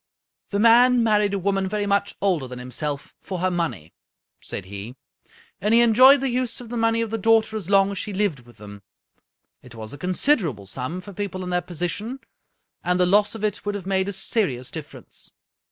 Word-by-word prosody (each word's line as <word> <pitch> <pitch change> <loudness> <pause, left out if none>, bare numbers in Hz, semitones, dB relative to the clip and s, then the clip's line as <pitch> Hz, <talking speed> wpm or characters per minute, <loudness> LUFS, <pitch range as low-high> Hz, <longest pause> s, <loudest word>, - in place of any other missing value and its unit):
" - - -57
The 200 - -1
man 240 +3 +5
married 210 -2 +2
a - - 0
woman 195 0 0
very 210 0 -1
much 200 0 0
older 180 -9 +1
than 125 0 -8
him 125 +1 -9
self 145 +2 -4
for 185 - -5
her 185 +1 0
money," 165 - -3 0.5
said - - -5
he, 100 +5 -8 0.3
" - - -29
and 210 +4 +3
he 235 - +6
enjoyed 255 +4 +7
the 270 - 0
use 250 -1 -2
of 245 -2 -10
the 240 - -5
money 225 0 +1
of 225 -2 -3
the 225 - -2
daughter 220 +1 +3
as 200 -4 -5
long 195 0 +4
as 200 - -4
she 210 - -4
lived 195 -7 -1
with 120 -1 -19
them. 100 -1 -11 0.8
It 125 -2 -14
was 110 +1 -8
a 145 - -10
considerable 180 - 0
sum, 130 - -5
for 200 +2 -11
people 190 -1 -4
in 180 - -5
their 180 0 +1
position, 180 - -4 0.6
and 180 0 +1
the 180 - +4
loss 205 +4 +3
of 220 - -7
it 210 -1 -1
would 205 0 -3
have 195 -3 -6
made 190 0 0
a - - -4
serious 150 - -1
difference. 155 -3 -10
195 Hz, 220 wpm, -23 LUFS, 155-220 Hz, 0.8 s, enjoyed